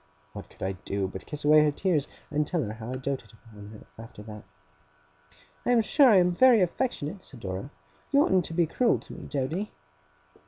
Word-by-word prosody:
What -, -, -9 dB
could -, -, -11 dB
I 95 Hz, -, -1 dB
do, 95 Hz, +1 st, -3 dB
but 95 Hz, 0 st, -9 dB
kiss 150 Hz, 0 st, -6 dB
away 150 Hz, +1 st, +7 dB
her 150 Hz, -, +3 dB
tears, 150 Hz, -1 st, 0 dB, 0.2 s
and 150 Hz, 0 st, 0 dB
tell 170 Hz, -4 st, 0 dB
her 105 Hz, -2 st, -5 dB
how 110 Hz, +1 st, -8 dB
I -, -, -3 dB
doted 135 Hz, -1 st, -5 dB, 0.2 s
on 100 Hz, -1 st, -11 dB
her, 110 Hz, +1 st, -13 dB
after 110 Hz, -2 st, -12 dB
that! 105 Hz, -1 st, -10 dB, 1.2 s
'I -, -, +1 dB
am 235 Hz, -, +5 dB
sure 265 Hz, +4 st, +5 dB
I 215 Hz, -, +6 dB
am 180 Hz, -1 st, +4 dB
very 245 Hz, +5 st, +5 dB
affectionate,' 185 Hz, -, -2 dB
said 130 Hz, -9 st, -11 dB
Dora; 95 Hz, +6 st, -5 dB, 0.4 s
'you 285 Hz, +1 st, +4 dB
oughtn't 185 Hz, -2 st, +2 dB
to -, -, -6 dB
be 170 Hz, -1 st, +3 dB
cruel 235 Hz, +9 st, +1 dB
to -, -, -12 dB
me, -, -, -9 dB
Doady! 155 Hz, +9 st, -3 dB
150 Hz, 205 wpm, -27 LUFS, 110-185 Hz, 1.2 s, away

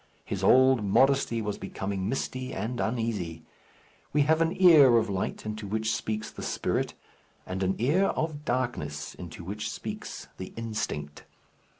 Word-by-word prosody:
His -, -, -4 dB
old 130 Hz, -2 st, +6 dB
modesty 120 Hz, +2 st, +3 dB
was 105 Hz, -1 st, -3 dB
becoming 95 Hz, 0 st, -3 dB
misty 130 Hz, 0 st, -3 dB
and 115 Hz, +5 st, -3 dB
uneasy. 105 Hz, -9 st, -2 dB, 0.7 s
We 150 Hz, -, +4 dB
have 160 Hz, +3 st, +3 dB
an 165 Hz, +3 st, 0 dB
ear 150 Hz, -10 st, +8 dB
of 110 Hz, -2 st, +1 dB
light, 95 Hz, +2 st, -3 dB
into 110 Hz, -1 st, -5 dB
which 110 Hz, +2 st, 0 dB
speaks 110 Hz, 0 st, -3 dB
the -, -, -9 dB
spirit; -, -, -1 dB, 0.5 s
and 95 Hz, +1 st, -4 dB
an 95 Hz, 0 st, +1 dB
ear 155 Hz, -, +3 dB
of 155 Hz, -5 st, -2 dB
darkness, 120 Hz, -, -2 dB
into 85 Hz, -1 st, -9 dB
which 105 Hz, +4 st, -4 dB
speaks -, -, -6 dB
the 95 Hz, -, -7 dB
instinct. 105 Hz, -10 st, -4 dB
110 Hz, 150 wpm, -28 LUFS, 95-130 Hz, 0.7 s, ear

